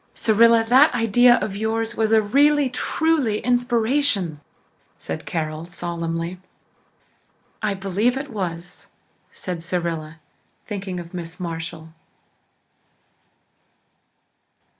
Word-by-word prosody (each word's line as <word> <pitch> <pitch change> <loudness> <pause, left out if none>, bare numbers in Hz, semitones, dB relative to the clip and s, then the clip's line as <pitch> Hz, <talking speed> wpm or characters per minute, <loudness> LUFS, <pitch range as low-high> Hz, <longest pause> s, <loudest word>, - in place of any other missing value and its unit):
"Cyrilla, 230 +1 +4
that 255 +4 +5
idea 240 +1 +5
of 195 - -4
yours 225 +2 -1
was 220 -1 0
a 220 -1 +5
really 285 +5 +3
truly 280 -4 0
inspiration," 240 - +1 0.6
said 80 - -6
Carol 155 0 -3
solemnly. 170 0 -4 1.2
"I 210 -2 0
believe 200 +6 0
it 275 0 -6
was," 175 -4 -5 0.4
said 180 -3 -6
Cyrilla, 165 -2 -4 0.5
thinking 195 -3 -5
of 170 0 -10
Miss 175 0 -7
Marshall. 165 -2 -6
200 Hz, 95 wpm, -22 LUFS, 170-240 Hz, 1.2 s, that